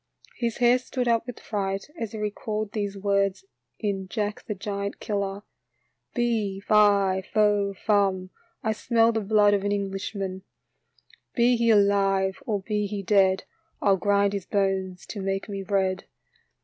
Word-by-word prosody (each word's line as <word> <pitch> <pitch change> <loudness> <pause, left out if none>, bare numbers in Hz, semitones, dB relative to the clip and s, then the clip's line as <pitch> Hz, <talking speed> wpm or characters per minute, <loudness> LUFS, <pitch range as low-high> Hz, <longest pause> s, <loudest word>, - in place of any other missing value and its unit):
His 235 -2 -2
hair 245 +1 +4
stood 255 0 -3
up 230 0 +2
with 245 - -7
fright 195 -2 -3
as 225 -9 -4
he - - -5
recalled 210 0 -3
these 205 -2 -3
words 200 - 0 0.3
in 195 -3 -2
" - - -35
Jack 210 -1 -3
the 210 - -3
Giant 200 0 -4
Killer 200 -1 -3 0.2
": - - -48
" - - -51
Fe, 225 -6 0
fi, 200 -2 +4
fo, 205 -2 +2
fum, 190 -2 +1 0.3
I 220 - +1
smell 230 +1 +2
the 220 -1 -1
blood 205 0 +4
of 200 -1 +1
an 205 - 0
Englishman; 195 -1 -3 0.9
be 245 0 +4
he 230 0 +2
alive 195 -2 +3
or 210 -4 0
be 210 0 -1
he 200 -1 -4
dead, 190 -1 +3 0.4
I 205 - +1
'11 195 -1 +4
grind 200 0 +2
his 200 -3 -3
bones 190 -2 -1
to 205 - -6
make 195 0 -2
me 200 -2 -4
bread." 190 -1 0
200 Hz, 165 wpm, -26 LUFS, 195-215 Hz, 0.9 s, hair